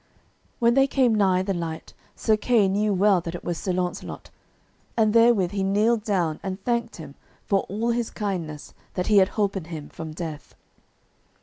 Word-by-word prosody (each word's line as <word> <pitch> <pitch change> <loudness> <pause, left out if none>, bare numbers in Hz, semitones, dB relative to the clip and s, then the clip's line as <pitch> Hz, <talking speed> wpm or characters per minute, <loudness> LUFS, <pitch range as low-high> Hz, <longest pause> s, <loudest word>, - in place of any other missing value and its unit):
When 235 -1 +3
they 270 +1 +4
came 260 -4 +2
nigh 190 -3 +3
the 195 0 -1
light, 165 -2 -5 0.2
Sir 220 - +2
Kay 215 -1 +3
knew 205 +2 +1
well 195 -1 +3
that 165 +1 -6
it - - -8
was 175 -2 -3
Sir 190 - -2
Launcelot, 180 0 -4 0.7
and 215 -2 +3
therewith 230 -6 +4
he 200 -1 -2
kneeled 210 +3 +2
down 175 -8 0
and 190 -1 -4
thanked 235 -1 -1
him 150 -4 -10 0.3
for 195 - +2
all 220 +5 -1
his 235 -1 -1
kindness 170 -8 -5 0.2
that 180 - -1
he 210 - +3
had 190 -1 +6
holpen 200 -4 0
him 160 -3 -8
from 160 -1 -7
death. 155 -2 -7
195 Hz, 180 wpm, -24 LUFS, 175-220 Hz, 0.7 s, had